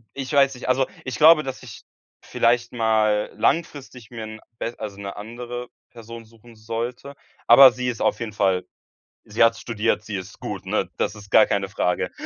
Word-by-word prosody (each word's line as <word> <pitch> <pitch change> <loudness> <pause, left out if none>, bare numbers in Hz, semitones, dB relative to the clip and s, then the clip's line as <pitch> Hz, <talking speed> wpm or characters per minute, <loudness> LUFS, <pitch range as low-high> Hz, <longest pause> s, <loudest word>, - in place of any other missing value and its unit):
ich 135 +1 -5
weiß 135 -1 +4
nicht 125 - -7
also, 130 +1 +2 0.2
ich 130 - -4
glaube, 155 0 +7
dass 135 -2 -7
ich 120 -4 -12 0.4
vielleicht 120 +1 0
mal 110 -2 +1
langfristig 140 -7 -2
mir 115 -2 -7
'n 110 0 -9 0.2
bes 115 - -4
also, 105 -3 -7
'ne 100 -1 -7
andere 120 +3 -7 0.2
Person 115 0 -11
suchen 115 +1 -19
sollte, 115 +5 -6 0.3
aber 130 +2 +9
sie 125 0 -4
ist 120 - -5
auf - - +1
jeden 115 -3 -5
Fall 95 -3 0 0.6
sie 105 +3 +1
hat 115 0 +3
studiert, 115 -1 -1
sie 105 -1 -6
ist 95 -1 -8
gut, - - -6
ne? - - -1
Das - - -1
ist 100 -1 -13
gar - - +7
keine 100 -1 -2
Frage. 90 -3 -1
115 Hz, 185 wpm, -23 LUFS, 110-125 Hz, 0.6 s, aber